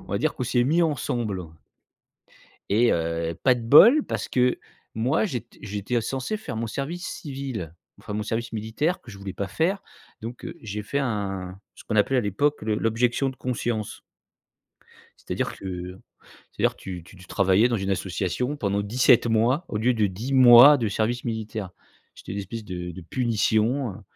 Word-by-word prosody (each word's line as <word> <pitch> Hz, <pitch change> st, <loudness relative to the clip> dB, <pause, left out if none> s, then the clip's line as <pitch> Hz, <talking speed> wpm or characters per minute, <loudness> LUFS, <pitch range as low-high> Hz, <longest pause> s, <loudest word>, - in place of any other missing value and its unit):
on -, -, -15 dB
va -, -, -2 dB
dire -, -, 0 dB
qu'on -, -, -3 dB
s'est 120 Hz, 0 st, +2 dB
mis 165 Hz, +6 st, +3 dB
ensemble 120 Hz, -, -1 dB, 1.3 s
et 115 Hz, +4 st, +4 dB
heu, 85 Hz, 0 st, -1 dB
pas 130 Hz, -2 st, +5 dB
de 120 Hz, -, -6 dB
bol 220 Hz, -, +7 dB
parce -, -, -3 dB
que 125 Hz, 0 st, +2 dB, 0.4 s
moi, 130 Hz, -, +1 dB
j'étais 120 Hz, -, -6 dB
j'étais 105 Hz, +4 st, -2 dB
censé 135 Hz, -, -3 dB
faire 140 Hz, -, -7 dB
mon 115 Hz, +1 st, -2 dB
service 155 Hz, +9 st, -4 dB
civil, 135 Hz, -, -6 dB, 0.3 s
enfin, 105 Hz, -, -7 dB
mon 105 Hz, +1 st, -2 dB
service 115 Hz, +1 st, -3 dB
militaire 115 Hz, -, -2 dB
que -, -, -14 dB
je 100 Hz, -, -11 dB
voulais 100 Hz, -1 st, -7 dB
pas 100 Hz, -, -3 dB
faire. 170 Hz, -, 0 dB, 0.4 s
Donc 115 Hz, +2 st, -7 dB
heu, -, -, -7 dB
j'ai 105 Hz, -1 st, -5 dB
fait 140 Hz, +7 st, -2 dB
un 95 Hz, -7 st, -3 dB, 0.2 s
ce -, -, -14 dB
qu'on 110 Hz, -, -3 dB
appelait 120 Hz, +5 st, +3 dB
à -, -, +3 dB
l'époque, 130 Hz, +9 st, 0 dB
le 105 Hz, 0 st, -1 dB
l'objection 120 Hz, +5 st, +1 dB
de 130 Hz, -, -10 dB
conscience 120 Hz, -4 st, -3 dB, 1.3 s
c'est-à-dire -, -, -2 dB
que 90 Hz, -1 st, -6 dB, 0.5 s
c'est-à-dire, -, -, 0 dB
tu 90 Hz, -3 st, -8 dB
tu 95 Hz, -, -16 dB
tu 90 Hz, +1 st, -15 dB
travaillais 100 Hz, +4 st, +3 dB
dans 120 Hz, -, 0 dB
une 95 Hz, -1 st, -3 dB
association 95 Hz, -, -2 dB
pendant 100 Hz, -4 st, 0 dB
17 120 Hz, +3 st, +4 dB
mois 120 Hz, +9 st, +2 dB
au 105 Hz, -, -2 dB
lieu 120 Hz, +4 st, +2 dB
de 110 Hz, -3 st, +2 dB
10 110 Hz, +9 st, -5 dB
mois 130 Hz, +2 st, +9 dB
de 115 Hz, -4 st, -1 dB
service 110 Hz, +4 st, -1 dB
militaire. 110 Hz, -4 st, -4 dB, 0.4 s
C'était -, -, -8 dB
une -, -, -4 dB
espèce 110 Hz, +3 st, -6 dB
de 90 Hz, -2 st, -5 dB
de 90 Hz, +2 st, -10 dB
punition, 115 Hz, +4 st, 0 dB
heu 95 Hz, -, -12 dB
115 Hz, 180 wpm, -25 LUFS, 100-130 Hz, 1.3 s, mois